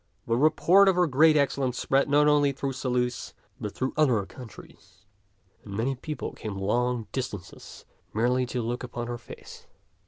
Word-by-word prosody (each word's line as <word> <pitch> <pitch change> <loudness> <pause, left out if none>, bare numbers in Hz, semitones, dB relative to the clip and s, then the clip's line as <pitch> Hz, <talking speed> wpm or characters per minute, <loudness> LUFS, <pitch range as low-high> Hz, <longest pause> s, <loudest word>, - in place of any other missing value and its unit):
The 115 - 0
report 160 +8 +4
of 190 - +2
her 180 0 +3
great 155 +2 +4
excellence 135 -3 0
spread 135 +1 +1
not 145 +1 +4
only 145 -1 +4
through 135 +1 -3
Saluces, 125 -1 -2 0.2
but 105 - -5
through 130 - -2
other 125 -10 +2
countries, 100 -5 -14 0.6
and 100 -2 -7
many 125 +5 0
people 150 +4 -6
came 105 -3 -6
long 120 +4 0
distances 110 -8 -7 0.3
merely 125 +3 +1
to 125 -1 -3
look 120 +2 -3
upon 120 -1 -5
her 120 0 -5
face. - - -12
125 Hz, 160 wpm, -27 LUFS, 115-140 Hz, 0.6 s, report